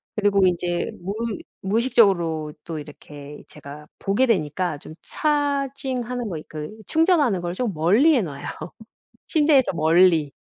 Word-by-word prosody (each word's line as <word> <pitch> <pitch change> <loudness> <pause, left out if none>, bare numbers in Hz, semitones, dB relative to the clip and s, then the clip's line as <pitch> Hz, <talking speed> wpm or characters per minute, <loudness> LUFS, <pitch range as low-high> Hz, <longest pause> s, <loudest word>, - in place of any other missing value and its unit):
그리고 205 -2 +2
인제 175 0 -1
무의 210 +4 -4 0.2
무의식적으로 190 -8 +2
또 160 -2 -6
이렇게 145 0 -11
제가 150 0 -11
보게 200 +7 +1
되니까 175 - -1
좀 155 - -12
차징하는 275 -5 -2
거, 160 -4 -5
그 155 +6 -7
충전하는 310 - +2
걸 175 0 -3
좀 220 0 -2
멀리 210 - +4
해 245 - +3
놔요, 140 -4 -7 0.8
침대에서 295 - +3
멀리. 165 -2 +3
190 Hz, 275 characters per minute, -23 LUFS, 155-250 Hz, 0.8 s, 멀리